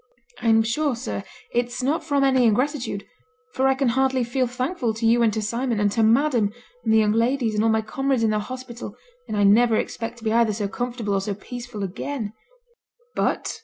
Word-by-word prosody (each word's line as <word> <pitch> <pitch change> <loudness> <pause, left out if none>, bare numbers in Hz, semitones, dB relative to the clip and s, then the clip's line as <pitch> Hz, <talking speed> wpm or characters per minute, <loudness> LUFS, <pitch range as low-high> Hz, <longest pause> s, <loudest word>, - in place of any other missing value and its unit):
'I'm 225 -2 +4
sure, 270 +4 0
sir, 230 -4 -4 0.3
it's 245 +1 -1
not 295 +6 0
from 285 -3 +1
any 260 -2 +4
ingratitude, 245 -2 0 0.5
for 265 +1 +2
I 265 - +3
can 265 -2 +1
hardly 265 +1 +2
feel 255 +2 0
thankful 250 -1 -2
to 225 +1 -2
you 235 +1 +4
and 230 -2 +4
to 220 0 -2
Sir 225 +3 -2
Simon, 245 -4 0
and 205 -1 +2
to 225 - +1
madam, 230 -1 +3 0.3
and 225 - +1
the 220 - +5
young 215 -1 +4
ladies, 230 +1 +1
and 210 0 +1
all 225 - +3
my 220 0 +2
comrades 265 +2 0
in 220 - +3
the 215 - +1
hospital, 250 +1 -7 0.3
and 210 - -3
I 205 - +3
niver 225 +3 +5
expect 230 +2 -3
to 230 - -14
be 220 -1 0
either 230 -2 +3
so 205 0 -2
comfortable 235 -1 -3
or 195 - +1
so 200 +1 -3
peaceful 240 0 -7
again, 215 +3 -4 0.8
but - - 0
' - - -2
'But? - - -6
235 Hz, 220 wpm, -23 LUFS, 220-255 Hz, 0.8 s, the